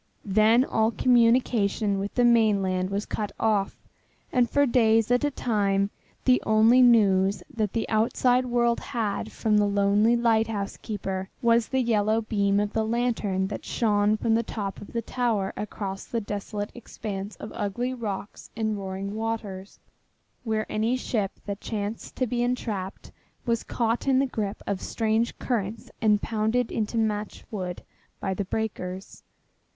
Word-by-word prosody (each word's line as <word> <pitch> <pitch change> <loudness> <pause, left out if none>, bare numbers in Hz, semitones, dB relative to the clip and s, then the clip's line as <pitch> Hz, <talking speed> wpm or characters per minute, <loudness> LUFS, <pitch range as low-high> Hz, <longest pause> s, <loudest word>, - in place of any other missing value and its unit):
Then 215 +5 +4
all 220 -4 +2
communication 230 -4 +2
with 200 +1 -4
the 245 - +4
mainland 200 -6 +3
was 200 +2 -2
cut 210 -1 -3
off, 210 -3 +1 0.5
and 245 -2 +2
for 285 0 +3
days 225 -3 +3
at 245 +2 +3
a 290 - +3
time 200 -6 0 0.3
the 255 -1 +4
only 220 +4 +5
news 200 -5 +4
that 215 -3 -1
the 230 - -1
outside 245 +3 +2
world 235 -1 +2
had 225 -7 -3
from 215 -1 +1
the 205 0 +3
lonely 205 +3 +3
lighthouse 225 -3 +1
keeper 190 -3 -4
was 235 -1 +4
the 265 -1 0
yellow 220 -1 +2
beam 200 -2 +1
of 205 0 -1
the 220 - +1
lantern 220 -4 0
that - - -5
shone 210 -2 +1
from 225 +1 +1
the 225 - +3
top 205 -3 -5
of 205 - -10
the 230 -1 -2
tower 225 -6 -1
across 195 -2 -5
the 235 - -2
desolate 205 0 -4
expanse 205 -4 -6
of 210 - -9
ugly 240 +6 -2
rocks 210 -5 -6
and 220 -2 -1
roaring 195 +1 -5
waters, 215 -3 -4 0.7
where 220 -2 -1
any 220 +3 0
ship 210 -6 -2
that 200 0 -5
chanced 210 0 -4
to 255 - 0
be 240 0 -1
entrapped 220 -6 -3 0.3
was 230 -2 +1
caught 230 +2 -1
in 265 -1 +4
the 270 - +3
grip 215 -5 -4
of 195 -2 -2
strange 225 +1 0
currents 220 -2 -3
and 210 -2 +3
pounded 225 +2 0
into 220 +1 -2
matchwood 210 -4 -3 0.4
by 190 - -2
the 195 +1 -3
breakers. 190 -3 -4
220 Hz, 155 wpm, -26 LUFS, 200-235 Hz, 0.7 s, only